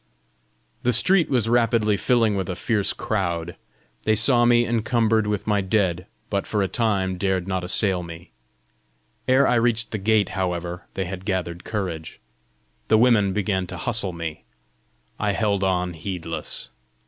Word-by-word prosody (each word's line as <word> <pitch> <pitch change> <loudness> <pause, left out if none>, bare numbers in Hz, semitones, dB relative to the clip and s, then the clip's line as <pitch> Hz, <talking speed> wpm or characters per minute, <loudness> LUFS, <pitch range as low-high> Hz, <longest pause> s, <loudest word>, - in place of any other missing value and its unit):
The 125 - +1
street 180 - +4
was 120 -5 +1
rapidly 115 -3 +2
filling 115 +1 +2
with 95 -2 -3
a 90 - -2
fierce 105 0 0
crowd. 85 -5 -2 0.5
They 110 - +2
saw 120 +2 +4
me 120 0 +4
encumbered 115 -1 +1
with 105 -1 -2
my 105 -2 +1
dead, 95 -2 0 0.2
but 100 -1 -1
for 105 -2 0
a - - 0
time 95 -5 0
dared 95 -2 0
not 95 -1 -2
assail 95 0 +1
me. 85 -3 -10 1.0
Ere 130 +2 +4
I - - +3
reached 115 -1 +1
the 110 - -3
gate, 105 +1 +2
however, 90 -1 -3
they 95 - -2
had 90 +1 -6
gathered 90 -3 -3
courage. 90 -7 -5 0.7
The 110 - +4
women 110 -4 +4
began 95 -2 -1
to 90 - -7
hustle 110 +1 +1
me; 85 -2 -6 0.8
I 105 -1 0
held 100 -2 0
on 90 -2 0
heedless. 80 -2 -5
100 Hz, 155 wpm, -23 LUFS, 90-110 Hz, 1.0 s, street